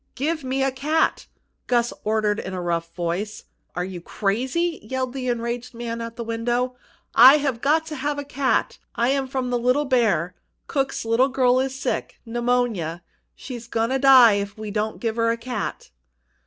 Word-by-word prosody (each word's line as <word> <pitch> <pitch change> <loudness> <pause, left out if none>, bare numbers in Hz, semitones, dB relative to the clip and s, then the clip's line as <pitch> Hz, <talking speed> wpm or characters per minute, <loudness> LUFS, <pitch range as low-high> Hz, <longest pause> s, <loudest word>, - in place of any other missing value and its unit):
"Give 310 +3 -1
me 265 +1 -1
a 270 - +1
cat!" 300 +5 0 0.4
Gus 240 -1 +1
ordered 215 -1 +1
in 185 - -5
a - - -3
rough 170 -1 -2
voice. 180 +5 -3 0.3
"Are 180 +1 -1
you 185 -2 -7
crazy?" 260 - -1
yelled 255 +3 -3
the 260 -2 -4
enraged 240 0 -3
man 230 0 -4
at 230 0 -6
the 235 - -5
window. 240 +2 -1 0.4
"I've 265 0 +6
got 315 +3 +2
to 315 -1 -6
have 290 +2 -2
a 285 - -3
cat! 275 -1 0 0.2
I'm 265 +3 +1
from 260 -1 -2
the 245 - +1
Little 250 +5 +2
Bear! 215 - +2 0.3
Cook's 275 -4 -2
little 235 +4 +3
girl 255 -1 +3
is 265 0 -1
sick 260 -1 -3
pneumonia! 230 -8 -1 0.3
She's 240 -3 -8
goin' 230 +1 -1
to 265 - +1
die 260 -5 +8
if 200 +1 -7
we 215 -1 -6
don't 215 +1 -2
get 225 -1 -2
her 230 0 +2
a 230 - 0
cat!" 245 - -5
240 Hz, 175 wpm, -23 LUFS, 220-265 Hz, 0.4 s, die